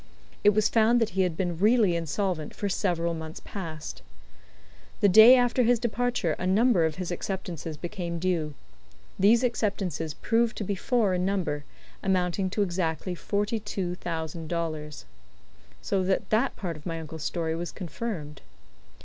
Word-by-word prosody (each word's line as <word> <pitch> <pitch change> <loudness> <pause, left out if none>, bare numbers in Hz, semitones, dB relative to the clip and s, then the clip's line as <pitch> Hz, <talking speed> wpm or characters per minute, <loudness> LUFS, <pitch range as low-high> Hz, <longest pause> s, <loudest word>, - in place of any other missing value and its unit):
It 205 0 +5
was 215 0 +4
found 230 +1 +4
that 225 -1 0
he 190 - +1
had 180 -3 0
been 175 -3 -2
really 210 -3 +4
insolvent 170 -1 -2
for 205 - -2
several 175 -3 0
months 160 -1 -7
past. 160 -6 -6 1.0
The - - +5
day 220 +6 +9
after 245 0 +3
his 245 0 +4
departure 240 -5 0
a 185 - -1
number 205 -2 +4
of 160 -1 -1
his 180 -1 -4
acceptances 175 -4 -4
became 170 +1 -4
due. 165 -4 -1 0.6
These 225 +5 +5
acceptances 195 -9 -1
proved 230 0 +1
to - - -2
be 200 - -1
four 210 0 +1
in 180 0 0
number, 180 -7 -1 0.4
amounting 185 0 0
to 205 +2 +1
exactly 180 -1 -2
forty 205 +5 -1
two 195 -4 -3
thousand 165 -2 -5
dollars. 155 - -4 0.8
So 195 -1 0
that 190 0 0
that 230 +5 +2
part 175 -5 -4
of 155 +3 -10
my 165 -1 -3
uncle's 160 -1 -7
story 160 -2 -1
was 170 +1 -4
confirmed. 165 -4 -6
185 Hz, 160 wpm, -27 LUFS, 165-210 Hz, 1.0 s, day